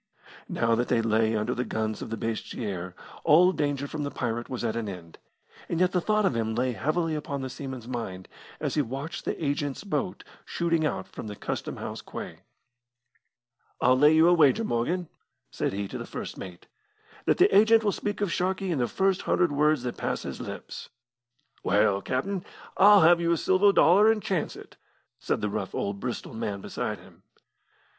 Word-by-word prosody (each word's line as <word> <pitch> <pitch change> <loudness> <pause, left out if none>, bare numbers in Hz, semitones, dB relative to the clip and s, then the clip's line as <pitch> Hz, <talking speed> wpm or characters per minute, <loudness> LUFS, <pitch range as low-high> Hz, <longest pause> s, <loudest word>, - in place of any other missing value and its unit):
Now 115 0 +1
that 120 +2 +1
they 115 - +2
lay 110 0 +2
under 105 0 0
the 125 - -1
guns 110 -2 -3
of - - -6
Basseterre, 105 -5 -4 0.3
all 180 +5 +6
danger 145 -4 -1
from 150 +1 -5
the 145 - -2
pirate 120 -3 -3
was 125 -2 -4
at 115 -1 -1
an 115 -3 -3
end, 85 -4 -10 0.5
and 170 - -1
yet 180 0 +3
the 180 - +1
thought 215 +2 +2
of 135 - +1
him 110 -1 -1
lay 125 +2 +1
heavily 155 +6 -1
upon 140 -3 -4
the 130 - -4
seaman's 130 -3 -7
mind 105 -7 -5 0.3
as - - -2
he 150 - +2
watched 140 +6 -5
the - - -2
agent's 145 +1 -2
boat 195 -2 -3 0.2
shooting 165 -2 0
out 95 - -4
from - - -8
the 105 - -6
Custom - - -4
house - - -6
quay. - - -8 1.4
"I'll 125 +1 +4
lay 150 +3 +6
you 160 +1 +6
a 175 - +6
wager, 165 +6 +4
Morgan," 170 - -1 0.4
said - - -1
he 100 0 -3
to - - -6
the - - -7
first - - -6
mate, 90 -2 -9 0.6
"that - - +3
the 380 +3 +4
agent 220 +2 +6
will 205 - +2
speak 205 +1 -4
of 200 -4 0
Sharkey 185 +1 -1
in 155 - 0
the 120 - +1
first 190 +4 +1
hundred 175 -4 +2
words 150 -1 +2
that 125 - -4
pass - - -2
his - - -6
lips." - - -7 0.7
"Well, 100 +1 +3
captain, 175 - -2 0.3
I'll 205 +1 +7
have 170 +1 +6
you 170 0 +2
a - - +1
silver 190 +5 +4
dollar, 200 +4 +6
and 225 - 0
chance 190 -5 -2
it," - - -13 0.4
said - - -1
the 105 - 0
rough 100 -2 -4
old 100 0 -2
Bristol 125 +1 -5
man 105 -3 -3
beside - - -4
him. - - -18
140 Hz, 195 wpm, -27 LUFS, 115-175 Hz, 1.4 s, I'll